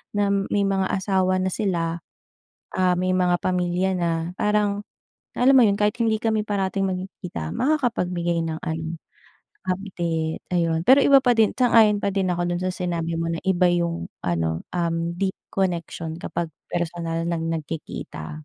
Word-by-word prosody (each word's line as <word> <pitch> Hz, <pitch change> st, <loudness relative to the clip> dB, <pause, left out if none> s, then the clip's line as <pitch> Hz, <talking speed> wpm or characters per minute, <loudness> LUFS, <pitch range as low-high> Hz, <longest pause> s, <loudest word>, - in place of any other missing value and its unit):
na 205 Hz, -1 st, +2 dB, 0.2 s
may 205 Hz, -, +2 dB
mga 190 Hz, -1 st, 0 dB
asawa 190 Hz, -1 st, +1 dB
na 185 Hz, -, 0 dB
sila, 170 Hz, -4 st, -1 dB, 0.7 s
ah, 185 Hz, -1 st, +2 dB
may 185 Hz, +1 st, 0 dB
mga 180 Hz, -1 st, +3 dB
pamilya 180 Hz, +1 st, 0 dB
na, 170 Hz, -1 st, 0 dB, 0.3 s
parang, 210 Hz, -1 st, +1 dB, 0.6 s
na -, -, 0 dB
alam 270 Hz, +1 st, +7 dB
mo -, -, +8 dB
'yon, 200 Hz, -, +2 dB
kahit 210 Hz, 0 st, +1 dB
hindi 220 Hz, -1 st, +2 dB
kami 220 Hz, -1 st, +1 dB
parating 195 Hz, -1 st, -1 dB
magkikita, 185 Hz, -, -5 dB
makakapagbigay 180 Hz, -, 0 dB
ng, 160 Hz, 0 st, -3 dB
ano, 160 Hz, +1 st, -3 dB, 0.7 s
update, 175 Hz, -4 st, -2 dB
ayon. 165 Hz, -1 st, +1 dB
Pero 270 Hz, +2 st, +7 dB
iba 275 Hz, -1 st, +7 dB
pa 250 Hz, -2 st, +3 dB
din 220 Hz, -2 st, +4 dB
sang-ayon 225 Hz, -4 st, +5 dB
pa 200 Hz, -1 st, -1 dB
din 190 Hz, -2 st, +1 dB
ako 175 Hz, 0 st, 0 dB
doon 175 Hz, -, -2 dB
sa 185 Hz, -, 0 dB
sinabi 170 Hz, -2 st, -2 dB
mo 165 Hz, -, -1 dB
na 165 Hz, -, -2 dB
iba 185 Hz, -1 st, +3 dB
'yong 170 Hz, -1 st, -1 dB, 0.2 s
ano, 80 Hz, -2 st, -1 dB
um, 170 Hz, -1 st, 0 dB
deep 195 Hz, -1 st, 0 dB, 0.2 s
connection 170 Hz, -3 st, -2 dB
kapag 170 Hz, -2 st, -3 dB, 0.2 s
personal 170 Hz, -1 st, -2 dB
ng 165 Hz, -1 st, -1 dB
nagkikita. 145 Hz, -, -7 dB
180 Hz, 160 wpm, -24 LUFS, 165-200 Hz, 0.7 s, mo